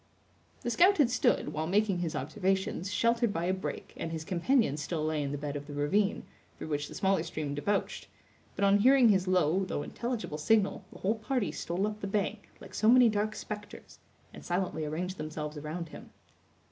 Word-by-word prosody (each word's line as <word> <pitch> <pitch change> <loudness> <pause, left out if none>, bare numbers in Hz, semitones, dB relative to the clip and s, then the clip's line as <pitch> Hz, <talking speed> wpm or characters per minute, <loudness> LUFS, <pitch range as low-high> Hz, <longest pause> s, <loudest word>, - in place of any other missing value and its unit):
The 240 - -2
scout 365 - +5
had 275 -6 +4
stood, 250 - +1
while 155 +1 -2
making 200 0 +2
his 170 -2 -2
observations, 190 +5 -1
sheltered 230 +2 +2
by 170 -2 -2
a 185 - +1
brake, 190 - -5
and 165 - -4
his 160 -1 -5
companions 180 - +1
still 155 0 -2
lay 155 -1 0
in 140 -1 -2
the 145 - -2
bed 145 0 -4
of 145 0 -6
the 145 - -7
ravine, 195 +9 +1 0.3
through - - -7
which 145 -1 -1
the - - -10
smaller 195 0 +2
stream 150 -2 -4
debouched; 200 +8 -2 0.5
but 200 - +1
on 200 +1 +5
hearing 255 +1 +6
his 190 -2 +3
low, 185 0 +2
though 185 -6 -3
intelligible, 230 -7 -4
signal 205 +5 +2
the - - -11
whole 215 +4 -1
party 220 - -1
stole 175 +5 -2
up 215 0 -4
the 200 - -3
bank, 205 +1 -2
like - - -12
so 215 - +3
many 245 -1 +7
dark 215 0 -1
specters, 210 -1 -8 0.3
and - - -11
silently 175 -3 -1
arranged 180 +5 -3
themselves 155 0 -5
around 155 +3 -5
him. - - -11
190 Hz, 195 wpm, -30 LUFS, 155-215 Hz, 0.5 s, many